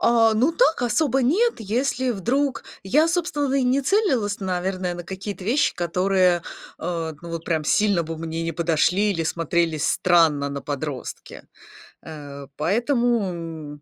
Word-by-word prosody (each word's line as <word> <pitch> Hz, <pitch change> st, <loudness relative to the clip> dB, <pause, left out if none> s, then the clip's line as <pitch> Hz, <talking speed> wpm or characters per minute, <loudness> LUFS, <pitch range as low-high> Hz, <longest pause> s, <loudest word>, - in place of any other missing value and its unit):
А, 230 Hz, -1 st, +4 dB
ну 255 Hz, +9 st, +2 dB
так, 330 Hz, -, +2 dB
особо 265 Hz, +3 st, +1 dB
нет, 420 Hz, -, +2 dB
если 250 Hz, +4 st, -1 dB
вдруг 255 Hz, +7 st, -1 dB, 0.2 s
я, 300 Hz, +11 st, +3 dB
собственно, 330 Hz, -5 st, -1 dB
и 275 Hz, -2 st, +2 dB
не 255 Hz, +2 st, +2 dB
целилась, 260 Hz, -, +1 dB
наверное, 185 Hz, -1 st, -2 dB
на 175 Hz, -, -6 dB
какие-то 190 Hz, +2 st, -7 dB
вещи, 260 Hz, +6 st, +2 dB
которые, 180 Hz, 0 st, +1 dB, 0.4 s
а, 165 Hz, -2 st, -3 dB
ну 170 Hz, -, -9 dB
вот 165 Hz, -1 st, -5 dB
прям 160 Hz, -2 st, -1 dB
сильно 200 Hz, 0 st, +2 dB
бы 165 Hz, +1 st, -5 dB
мне 165 Hz, +1 st, -4 dB
не 165 Hz, -, -2 dB
подошли 170 Hz, +5 st, +1 dB
или 165 Hz, -4 st, -1 dB
смотрелись 165 Hz, -1 st, 0 dB
странно 160 Hz, -5 st, +3 dB
на 140 Hz, 0 st, -4 dB
подростке. 145 Hz, -2 st, -6 dB, 0.6 s
Э, 145 Hz, -3 st, -9 dB
поэтому, 235 Hz, -, +1 dB, 0.6 s
м, -, -, -27 dB
190 Hz, 150 wpm, -23 LUFS, 165-250 Hz, 0.6 s, А